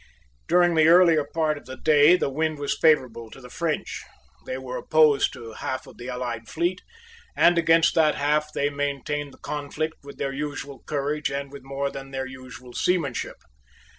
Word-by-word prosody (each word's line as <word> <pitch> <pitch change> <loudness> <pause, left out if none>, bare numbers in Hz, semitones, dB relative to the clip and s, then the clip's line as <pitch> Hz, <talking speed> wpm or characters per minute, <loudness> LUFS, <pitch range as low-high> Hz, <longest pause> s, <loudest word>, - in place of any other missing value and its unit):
During 175 0 +4
the 160 -1 +4
earlier 170 -3 +6
part 155 -2 0
of - - -21
the 130 0 -9
day 150 +2 +5
the 140 - -1
wind 155 +2 -1
was 145 -1 -2
favourable 130 -8 +2
to 135 - -13
the 125 -1 -13
French; 165 0 -3 0.5
they 130 - -3
were 130 -1 -6
opposed 155 -2 +3
to 120 -4 -9
half 130 +3 -5
of - - -15
the 120 +2 -8
allied 120 -3 -5
fleet; 175 +3 -1 0.5
and 175 - +5
against 165 0 +4
that 155 -2 +3
half 150 +1 0
they 145 -1 -1
maintained 145 0 -3
the - - -17
conflict 150 +2 -4
with 140 - -11
their 135 -1 -3
usual 140 -1 -5
courage 150 +1 -1
and 140 0 -4
with 140 -1 -10
more 140 +1 -3
than 135 0 -8
their 135 -1 -4
usual 130 -1 -11
seamanship. 150 -9 -1
145 Hz, 180 wpm, -25 LUFS, 135-155 Hz, 0.5 s, earlier